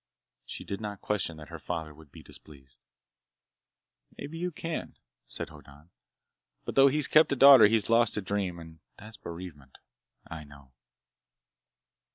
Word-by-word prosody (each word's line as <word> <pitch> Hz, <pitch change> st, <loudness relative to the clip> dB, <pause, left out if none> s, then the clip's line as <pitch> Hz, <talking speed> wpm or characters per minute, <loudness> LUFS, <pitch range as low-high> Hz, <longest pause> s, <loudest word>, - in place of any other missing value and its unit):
She -, -, -7 dB
did 100 Hz, +2 st, -5 dB
not 105 Hz, -2 st, -6 dB
question 95 Hz, -6 st, -2 dB
that 75 Hz, +1 st, -12 dB
her 85 Hz, -1 st, -9 dB
father 80 Hz, -2 st, -5 dB
would 75 Hz, -1 st, -18 dB
be -, -, -14 dB
displeased. 70 Hz, -3 st, -14 dB, 1.4 s
"Maybe 160 Hz, +3 st, -8 dB
you 180 Hz, +1 st, -2 dB
can," 165 Hz, 0 st, -6 dB, 0.3 s
said -, -, -6 dB
Hoddan, 75 Hz, +4 st, -17 dB, 0.7 s
"but -, -, -4 dB
though 135 Hz, 0 st, +6 dB
he's 150 Hz, 0 st, 0 dB
kept 155 Hz, 0 st, +4 dB
a -, -, 0 dB
daughter 135 Hz, -4 st, +9 dB
he's 110 Hz, -1 st, +1 dB
lost 115 Hz, -2 st, +2 dB
a -, -, -1 dB
dream. 95 Hz, -2 st, -2 dB
And 80 Hz, -1 st, -12 dB, 0.2 s
that's 110 Hz, +1 st, -13 dB
bereavement! 85 Hz, -6 st, -10 dB, 0.5 s
I 80 Hz, -1 st, -9 dB
know!" 70 Hz, -2 st, -17 dB
90 Hz, 150 wpm, -28 LUFS, 75-115 Hz, 1.4 s, daughter